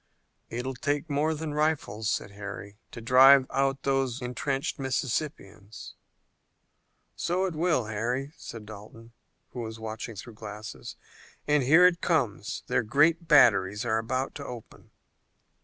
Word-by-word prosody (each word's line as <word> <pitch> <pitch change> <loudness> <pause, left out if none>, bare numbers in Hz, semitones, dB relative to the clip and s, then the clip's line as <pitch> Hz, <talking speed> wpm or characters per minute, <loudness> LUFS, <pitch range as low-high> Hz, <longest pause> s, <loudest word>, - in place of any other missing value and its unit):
"It 120 +2 -4
will 130 - -3
take 145 +4 -2
more 155 +3 +1
than 155 -1 -5
rifles," 145 -9 -1
said 100 - -2
Harry, 100 0 -9
"to 120 - -9
drive 130 +3 +7
out 135 0 0
those 135 -2 0
intrenched 135 +3 -3
Mississippians." 125 -5 -4 1.2
"So 180 +2 0
it 185 - -3
will, 160 -6 +1
Harry," 120 +7 -3
said 115 -2 -9
Dalton, 110 +2 -12 0.4
who 125 - -7
was 110 -1 -6
watching 110 +1 -6
through 115 +4 -9
glasses, 105 0 -9 0.5
"and 150 -1 +3
here 160 +8 +6
it 180 -1 +3
comes. 120 - -1
Their 125 0 +1
great 155 +9 +2
batteries 105 -7 +4
are 110 -1 +1
about 130 +4 -2
to 145 - -7
open." 120 -4 -10
125 Hz, 140 wpm, -27 LUFS, 110-145 Hz, 1.2 s, drive